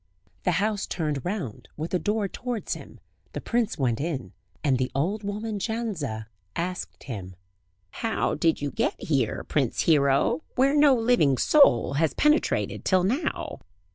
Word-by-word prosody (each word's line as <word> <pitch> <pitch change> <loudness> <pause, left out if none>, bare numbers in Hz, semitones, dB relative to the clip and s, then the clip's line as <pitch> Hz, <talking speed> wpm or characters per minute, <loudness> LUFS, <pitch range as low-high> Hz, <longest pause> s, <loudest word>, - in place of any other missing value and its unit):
The 180 - +3
house 205 +3 0
turned 150 -5 -2
round, 180 - -4
with 160 +2 -4
the 180 - +1
door 210 +4 0
towards 240 +2 -4
him; - - -10 0.3
the - - -3
prince 235 -2 -1
went 125 -6 0
in, 140 - -3 0.3
and 135 -4 +2
the 130 - 0
old 185 +10 0
woman 210 +1 -3
Jandza 190 - -3 0.3
asked 180 +1 -4
him: 95 -7 -7 0.6
"How 225 -1 -1
did 165 -3 +1
you 145 - -1
get - - -1
here, 135 -8 0
Prince 135 -6 0
Hero, 140 0 +3
where 270 +3 +3
no 290 -2 +6
living 225 - +3
soul 285 - +5
has 160 - +1
penetrated 300 +1 +2
till 185 -2 +3
now?" 265 - -1
180 Hz, 150 wpm, -26 LUFS, 140-225 Hz, 0.6 s, no